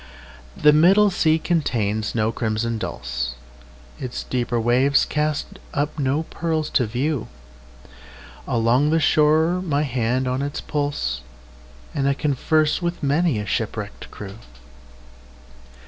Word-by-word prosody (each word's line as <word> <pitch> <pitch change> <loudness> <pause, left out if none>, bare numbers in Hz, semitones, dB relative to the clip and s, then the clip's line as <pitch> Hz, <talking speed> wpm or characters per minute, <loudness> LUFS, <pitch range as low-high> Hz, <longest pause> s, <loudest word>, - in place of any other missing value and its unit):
The 150 0 +6
middle 195 +7 +5
sea 160 -3 +3
contains 115 - -1
no 110 -1 +1
crimson 115 0 -2
dulse, - - -4 0.6
Its 125 -1 -5
deeper 120 -1 -1
waves 125 +5 +3
cast 150 0 -2 0.2
up 145 +2 -1
no 140 +3 +1
pearls 160 -1 -2
to 125 - +2
view; 130 +4 -1 1.2
Along 120 +5 +2
the 165 +1 +3
shore 160 +3 +3
my 150 -5 0
hand 130 -1 0
is 125 - -1
on 130 +2 -1
its 140 0 -3
pulse, 145 - -2 0.7
And 140 0 +1
I 140 - +1
converse 150 +3 +1
with 170 -2 -3
many 145 -1 +2
a 105 - -3
shipwrecked - - -4
crew. 100 +1 -9
140 Hz, 125 wpm, -22 LUFS, 115-155 Hz, 1.2 s, The